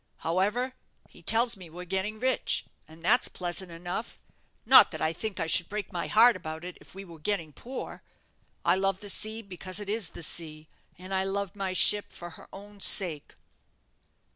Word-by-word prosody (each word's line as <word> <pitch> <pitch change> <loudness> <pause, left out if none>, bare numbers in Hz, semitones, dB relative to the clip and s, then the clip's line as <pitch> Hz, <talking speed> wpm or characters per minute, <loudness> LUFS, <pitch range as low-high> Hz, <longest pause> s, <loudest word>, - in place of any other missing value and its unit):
However, 210 +10 0 0.3
he - - -18
tells 235 +1 +2
me 185 -4 -12
we're 175 +3 -9
getting 190 +4 -3
rich, 255 +3 +1 0.2
and 160 +1 -15
that's 245 +8 +4
pleasant 175 0 -3
enough 175 +6 -6 0.5
not - - +8
that - - -7
I 155 +1 0
think 205 +1 -5
I 165 - -1
should 165 +1 +3
break 210 -1 -5
my 175 - -3
heart 235 +2 +6
about 160 -2 -7
it 180 - -8
if - - -17
we 195 0 -9
were 165 -3 -13
getting 165 -3 -2
poor. 255 - -8 0.6
I - - +3
love 195 0 -1
the 205 -1 +1
sea 220 +3 +1
because 185 0 -4
it 205 -1 -7
is 215 -5 -2
the - - -9
sea, 155 -2 -4 0.3
and 185 +2 -8
I 190 0 +1
love 200 0 -3
my 195 -2 -3
ship 205 +2 +5
for 175 0 -9
her - - -15
own 205 +1 -12
sake." 175 -7 +3
190 Hz, 190 wpm, -28 LUFS, 170-210 Hz, 0.6 s, not